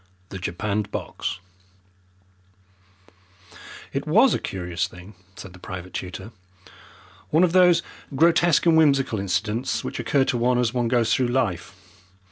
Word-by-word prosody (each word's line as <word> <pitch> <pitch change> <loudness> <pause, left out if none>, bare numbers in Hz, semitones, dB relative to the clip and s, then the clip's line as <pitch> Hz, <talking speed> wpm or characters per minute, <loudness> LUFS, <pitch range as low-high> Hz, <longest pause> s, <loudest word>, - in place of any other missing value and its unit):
The 95 - -7
Japanned 100 +3 -3
Box 90 - -5 2.5
It - - -3
WAS - - +5
a - - 0
curious 90 -1 -3
thing, 90 +3 -13 0.2
said 90 - -11
the 90 - -14
private 90 0 -8
tutor; 95 +3 -6 1.0
one 160 +4 +3
of 180 - +3
those 180 -2 +5 0.3
grotesque 170 +1 +3
and 165 -1 +5
whimsical 140 -8 +3
incidents 105 +6 -2
which - - -5
occur 135 -2 +1
to 120 - -1
one 125 +1 +2
as 120 -1 0
one 120 -2 0
goes 115 -2 +2
through 130 - +1
life. 115 -9 -2
115 Hz, 135 wpm, -23 LUFS, 95-135 Hz, 2.5 s, WAS